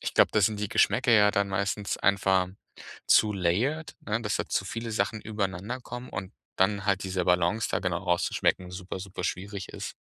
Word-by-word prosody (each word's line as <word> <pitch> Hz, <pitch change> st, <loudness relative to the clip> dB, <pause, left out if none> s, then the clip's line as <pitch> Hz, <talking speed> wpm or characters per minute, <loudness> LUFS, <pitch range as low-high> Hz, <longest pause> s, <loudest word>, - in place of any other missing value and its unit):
ich -, -, -3 dB
glaube, -, -, +5 dB
da 110 Hz, -, +3 dB
sind 105 Hz, +1 st, +2 dB
die 105 Hz, -, 0 dB
Geschmäcker 120 Hz, -, +3 dB
ja 105 Hz, -2 st, +6 dB
dann 100 Hz, -1 st, +1 dB
meistens 100 Hz, +1 st, -1 dB
einfach 95 Hz, -1 st, +2 dB, 0.6 s
zu 105 Hz, -1 st, +5 dB
layered, 105 Hz, -, 0 dB
ne, 110 Hz, +1 st, -2 dB
dass 105 Hz, -2 st, -1 dB
da -, -, -3 dB
zu -, -, 0 dB
viele 115 Hz, +3 st, -5 dB
Sachen 110 Hz, 0 st, -1 dB
übereinanderkommen 110 Hz, +5 st, -4 dB
und 95 Hz, +1 st, -6 dB, 0.2 s
dann 100 Hz, +1 st, +2 dB
halt 95 Hz, -1 st, +1 dB
diese 95 Hz, -1 st, -1 dB
Balance 90 Hz, +5 st, +2 dB
da -, -, +1 dB
genau 90 Hz, -3 st, -1 dB
rauszuschmecken 90 Hz, 0 st, 0 dB
super, 95 Hz, 0 st, -6 dB
super, 95 Hz, -1 st, -7 dB
schwierig 100 Hz, +1 st, -4 dB
ist. -, -, -6 dB
100 Hz, 185 wpm, -28 LUFS, 95-105 Hz, 0.6 s, ja